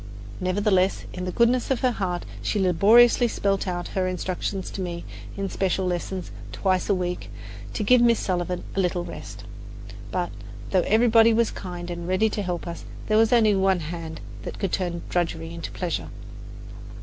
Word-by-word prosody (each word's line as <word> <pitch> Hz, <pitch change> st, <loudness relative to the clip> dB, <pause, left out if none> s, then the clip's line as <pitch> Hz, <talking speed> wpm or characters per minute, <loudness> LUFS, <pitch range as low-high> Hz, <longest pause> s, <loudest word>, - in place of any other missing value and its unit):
Nevertheless, 190 Hz, 0 st, +1 dB
in 180 Hz, 0 st, -4 dB
the 180 Hz, -, -2 dB
goodness 235 Hz, +4 st, +2 dB
of 265 Hz, -3 st, 0 dB
her 255 Hz, -, +3 dB
heart 185 Hz, -6 st, -2 dB, 0.2 s
she -, -, -1 dB
laboriously 220 Hz, +7 st, +5 dB
spelled 200 Hz, -3 st, 0 dB
out 175 Hz, -1 st, -3 dB
her 185 Hz, -1 st, -1 dB
instructions 185 Hz, +1 st, -3 dB
to 195 Hz, -, -5 dB
me 170 Hz, -2 st, -4 dB, 0.3 s
in 195 Hz, 0 st, -1 dB
special 190 Hz, 0 st, 0 dB
lessons 180 Hz, +1 st, -3 dB, 0.2 s
twice 185 Hz, -1 st, 0 dB
a 200 Hz, -, +4 dB
week, 180 Hz, -1 st, -3 dB, 0.4 s
to 215 Hz, -, -2 dB
give 250 Hz, +3 st, +5 dB
Miss 235 Hz, -1 st, +5 dB
Sullivan 180 Hz, -1 st, -2 dB
a -, -, 0 dB
little 180 Hz, -1 st, 0 dB
rest. -, -, -9 dB, 0.7 s
But, -, -, -2 dB, 0.4 s
though 185 Hz, -, +4 dB
everybody 225 Hz, 0 st, +5 dB
was 230 Hz, -1 st, +2 dB
kind 175 Hz, -1 st, -6 dB
and 170 Hz, 0 st, -5 dB
ready 195 Hz, +4 st, +2 dB
to 210 Hz, -, -2 dB
help 180 Hz, -3 st, -3 dB
us, 170 Hz, 0 st, -6 dB, 0.3 s
there 215 Hz, -, +4 dB
was 225 Hz, 0 st, +4 dB
only 220 Hz, -4 st, +5 dB
one 190 Hz, -2 st, +2 dB
hand 160 Hz, 0 st, -6 dB, 0.2 s
that -, -, -6 dB
could 195 Hz, -, -2 dB
turn 175 Hz, -2 st, -2 dB
drudgery 165 Hz, -2 st, -2 dB
into 170 Hz, -, -6 dB
pleasure. 155 Hz, -, -3 dB
185 Hz, 175 wpm, -25 LUFS, 175-215 Hz, 0.7 s, laboriously